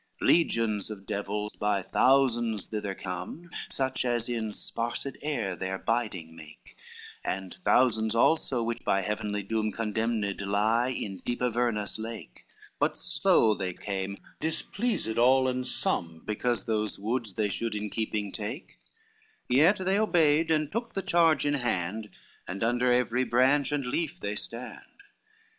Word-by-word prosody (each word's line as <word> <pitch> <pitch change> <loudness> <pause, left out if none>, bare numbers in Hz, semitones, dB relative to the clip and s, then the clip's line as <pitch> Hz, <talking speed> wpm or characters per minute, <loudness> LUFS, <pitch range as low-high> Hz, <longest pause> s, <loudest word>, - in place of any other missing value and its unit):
XI - - -3
Legions 115 - +2
of 100 -2 -8
devils 105 +1 -3
by 105 -2 0
thousands 120 -4 +3
thither 105 -3 -4
come, 90 - -6 0.2
Such 130 -1 -1
as 120 -2 0
in 115 -3 -2
sparsed 120 +5 -3
air 115 -11 -2
their 95 +2 -3
biding 100 -8 -2
make, 75 -2 -14 0.5
And 95 -1 -4
thousands 110 -6 +3
also 125 -1 +3
which 115 +1 -3
by 95 - +2
Heavenly 105 +1 -2
doom 110 +1 -1
Condemned 110 -1 -1
lie 105 +4 +2
in 100 -7 -4
deep 120 - -3
Avernus 120 -3 0
lake, 110 - -8 0.3
But - - +1
slow 110 -1 +3
they 95 -3 -3
came, 100 -1 -4 0.2
displeased 160 - 0
all 130 +2 +5
and 130 0 -1
some 80 -7 +1
Because 120 +3 -1
those 110 -3 -1
woods 110 0 -2
they 105 -2 +1
should 115 +2 -2
in 105 -1 -3
keeping 105 -2 -2
take, 110 - -6 0.7
Yet 175 +10 +4
they 195 +2 +2
obeyed 165 -6 +3
and 155 -2 +1
took 230 +2 -4
the 195 - -1
charge 165 -5 +4
in 145 - +2
hand, 110 -5 -2 0.4
And 100 +4 -4
under 120 +2 +2
every 125 0 +2
branch 130 +3 +3
and 145 -2 -1
leaf 165 +6 -2
they 100 - -3
stand. 120 - -5
115 Hz, 145 wpm, -28 LUFS, 105-130 Hz, 0.7 s, all